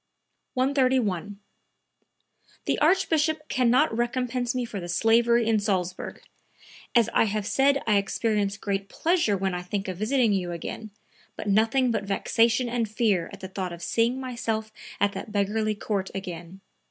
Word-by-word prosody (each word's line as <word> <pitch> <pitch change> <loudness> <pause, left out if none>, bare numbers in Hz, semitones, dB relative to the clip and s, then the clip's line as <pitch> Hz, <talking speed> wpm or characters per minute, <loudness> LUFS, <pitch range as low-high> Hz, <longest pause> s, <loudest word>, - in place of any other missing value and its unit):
131. 255 - +1 1.3
"The - - 0
Archbishop 315 -2 +2
can 250 -2 +2
not 255 0 +3
recompense 245 +1 -1
me 250 -1 -1
for 215 -3 -6
the 175 -1 -7
slavery 230 +5 +3
in 225 -1 +3
Salzburg! 185 -3 -2 0.7
As 235 -2 +5
I - - +4
have 210 -1 -2
said 275 +6 +2
I 210 -2 +3
experience 205 0 0
great 200 -1 -3
pleasure 325 - +1
when 190 0 -1
I 180 - -3
think 195 +3 -4
of 185 -2 -4
visiting 230 +1 +2
you 180 -3 -1
again, 215 +6 -6 0.5
but - - -6
nothing 225 +5 +3
but 220 - -1
vexation 230 +4 +2
and 235 -2 -1
fear 210 -5 +1
at - - -11
the 190 - -5
thought 185 -2 -4
of 170 0 -9
seeing 235 +6 +1
myself 225 -4 -3 0.3
at 205 0 +2
that 210 - -7
beggarly 210 +1 0
court 200 -2 -2
again. 180 -1 -7
220 Hz, 155 wpm, -26 LUFS, 195-245 Hz, 1.3 s, As